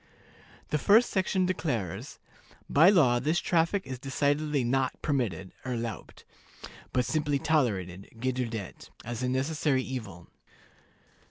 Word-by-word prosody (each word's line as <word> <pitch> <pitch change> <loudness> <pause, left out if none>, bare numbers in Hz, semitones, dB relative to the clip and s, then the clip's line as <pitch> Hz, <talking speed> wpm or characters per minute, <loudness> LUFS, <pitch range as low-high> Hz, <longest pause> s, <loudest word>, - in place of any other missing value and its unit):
The 150 - +1
first 220 - +5
section 190 -1 +1
declares, 125 - -3 0.5
"By 160 +6 +6
law 135 -11 +4
this 155 +7 0
traffic 175 +3 +1
is 130 -2 -6
decidedly 145 +1 0
not 130 +2 0
permitted 105 - -1
(erlaubt), 120 -3 -5 0.7
but 125 -1 +1
simply 150 +1 0
tolerated 105 - 0
(geduldet) 120 -4 -4 0.2
as 120 0 -4
a 125 - 0
necessary 135 0 0
evil." 110 -11 -7
130 Hz, 110 wpm, -28 LUFS, 120-155 Hz, 0.7 s, By